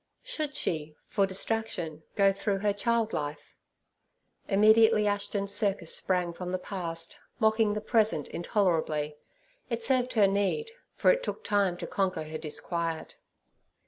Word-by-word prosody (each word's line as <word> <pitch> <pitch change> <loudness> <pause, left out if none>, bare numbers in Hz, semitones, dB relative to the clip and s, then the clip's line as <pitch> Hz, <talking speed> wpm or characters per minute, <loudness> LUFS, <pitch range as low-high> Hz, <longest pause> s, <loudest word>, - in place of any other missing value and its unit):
Should 310 - -3
she 155 -2 -2
for 195 -1 +1
distraction 190 -5 -1
go 195 -1 +5
through 200 +1 -1
her 205 - +3
child 225 +2 0
life? 145 0 -4 0.9
Immediately 215 +1 +5
Ashton's 200 -1 -1
circus 195 -5 +1
sprang 180 -2 0
from 180 +1 -5
the 185 - 0
past, 170 -3 -5 0.2
mocking 220 -1 +3
the 210 - -2
present 215 - +1
intolerably. 160 -5 0 0.5
It - - -2
served 255 - +2
her 210 -3 +6
need, 200 - 0 0.2
for - - +5
it - - +1
took 455 - -5
time 200 -4 +1
to - - -5
conquer 185 -5 -1
her 155 0 -6
disquiet. 165 +1 -3
200 Hz, 140 wpm, -29 LUFS, 170-220 Hz, 0.9 s, her